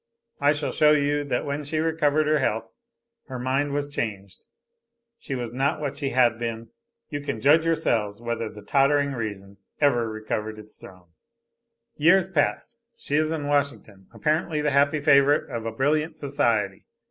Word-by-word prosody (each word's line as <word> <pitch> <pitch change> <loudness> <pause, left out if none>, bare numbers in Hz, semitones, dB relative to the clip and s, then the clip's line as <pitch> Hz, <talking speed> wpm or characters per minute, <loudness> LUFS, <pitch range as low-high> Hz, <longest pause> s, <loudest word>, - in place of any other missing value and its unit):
I 145 +1 +4
shall 145 -1 -3
show 150 0 +4
you 145 0 +1
that 125 -3 -2
when 145 +1 -3
she 150 +2 -3
recovered 155 -1 +1
her 155 0 +2
health, 110 -3 -2 0.5
her 130 -3 -6
mind 135 +3 -1
was 145 0 -2
changed, 100 -9 -5 0.8
she 140 -11 -5
was 120 -2 -5
not 135 +4 0
what 145 -2 -3
she 140 -2 -2
had 120 -3 +2
been. 115 -1 -4 0.4
You 145 -1 -3
can 140 -5 -4
judge 155 +7 +4
yourselves 115 -11 0
whether 115 -1 -3
the 105 -1 -12
tottering 140 +5 +2
reason 100 -4 -6 0.2
ever 120 -6 +2
recovered 110 0 -4
its 105 0 -13
throne. 90 -2 -15 0.9
"Years 175 +4 +4
pass. 190 +7 -1 0.2
She 145 - -3
is 155 +1 +2
in 155 -3 -3
Washington, 140 -9 -2
apparently 150 +6 -1
the 150 0 0
happy 140 +2 +2
favorite 140 +1 +4
of 115 -2 -4
a - - -2
brilliant 150 +6 0
society. 115 -9 -1
140 Hz, 165 wpm, -25 LUFS, 115-150 Hz, 0.9 s, I